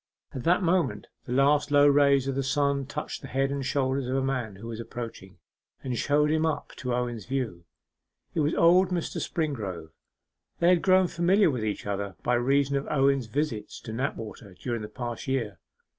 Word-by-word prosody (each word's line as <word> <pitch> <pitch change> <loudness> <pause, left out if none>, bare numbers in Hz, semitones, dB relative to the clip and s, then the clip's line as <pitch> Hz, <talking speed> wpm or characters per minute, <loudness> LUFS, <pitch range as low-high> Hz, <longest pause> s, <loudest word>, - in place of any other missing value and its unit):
At 130 - -6
that 180 +3 +3
moment 175 0 +1 0.2
the - - -7
last 145 +2 +3
low 145 0 +5
rays 140 -2 +4
of 135 - 0
the 135 - -1
sun 140 0 0
touched 150 +2 -5
the 135 - -8
head 135 +1 0
and 140 -1 -2
shoulders 135 -1 0
of 130 - -1
a 135 - +1
man 125 -6 -2
who 100 +4 -11
was 115 -1 -6
approaching, 115 -4 -8 0.5
and 130 -2 -2
showed 150 +4 +2
him 160 0 +2
up 160 -2 -1
to 125 - -3
Owen's 120 -4 -3
view. 120 -10 -3 0.7
It - - -1
was 150 +1 +1
old 180 +2 +5
Mr. 175 -3 -2
Springrove. 105 - -3 0.7
They 170 - +3
had 180 -2 +4
grown 185 -1 +5
familiar 175 +2 +3
with 125 -5 -3
each 105 -1 -3
other 100 -2 -3
by 125 - +1
reason 135 +3 +2
of 140 - -4
Owen's 135 -4 +2
visits 130 -3 -3
to 110 - -7
Knapwater 110 -5 -5
during 120 +4 -4
the 105 - -5
past 120 0 -6
year. 115 - -2
135 Hz, 190 wpm, -27 LUFS, 115-145 Hz, 0.7 s, low